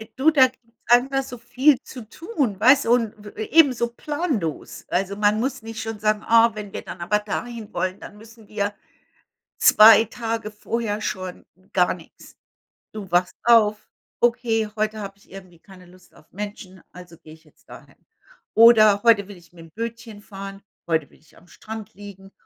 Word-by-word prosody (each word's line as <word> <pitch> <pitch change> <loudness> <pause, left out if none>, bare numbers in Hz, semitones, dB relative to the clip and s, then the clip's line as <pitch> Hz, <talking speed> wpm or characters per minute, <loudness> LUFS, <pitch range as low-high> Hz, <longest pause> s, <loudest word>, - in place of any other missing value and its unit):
Du, 300 +5 +3
da 265 -4 +6
gibt's 255 - -19 0.3
einfach 265 +3 +3
so 250 -2 -9
viel 255 +4 +2
zu 250 - -10
tun, 285 - -3
weil 255 +6 +7
so 245 -4 +2
'n 230 -3 -2
w 210 0 -12 0.2
eben 310 -4 +6
so 235 0 -1
planlos. 290 - -4
Also, 195 +2 -1
man 210 +1 +1
muss 260 +2 -3
nicht 225 0 -7
schon 225 -1 -6
sagen: 215 0 0
„Ah, 230 0 +5
wenn 210 -2 -8
wir - - -5
dann 175 -2 -10
aber 210 +5 +1
dahin 220 +1 -6
wollen, 185 +1 -3
dann 210 - -12
müssen 220 0 -17
wir 205 0 -3 0.9
2 220 +1 +7
Tage 225 -1 -5
vorher 215 0 -4
schon“, 185 -3 -5 0.3
gar 180 -1 +2
nix. 170 -2 -17 0.6
Du 205 -4 -9
wachst 180 +1 +1
auf: 215 -3 +3 0.3
„Okay, 235 -2 +1
heute 215 0 -2
habe 195 -1 -8
ich - - -26
irgendwie 185 -3 -13
keine 185 -1 -17
Lust 180 0 -21
auf 155 - -22
Menschen, 195 -2 -8
also 180 -2 -14
gehe 155 - -15
ich 160 0 -22
jetzt 150 - -28
dahin.“ - - -15 0.6
Oder: 215 -3 +6
„Heute 210 -4 +4
will 205 - -11
ich 175 -1 -20
mit'm 165 -2 -15
Bötchen 230 -1 -7
fahren. 195 -1 -9 0.3
Heute 160 -3 0
will - - -23
ich 155 - -25
am - - -20
Strand 215 +5 -10
liegen. 195 0 -13
215 Hz, 180 wpm, -22 LUFS, 195-230 Hz, 0.9 s, weil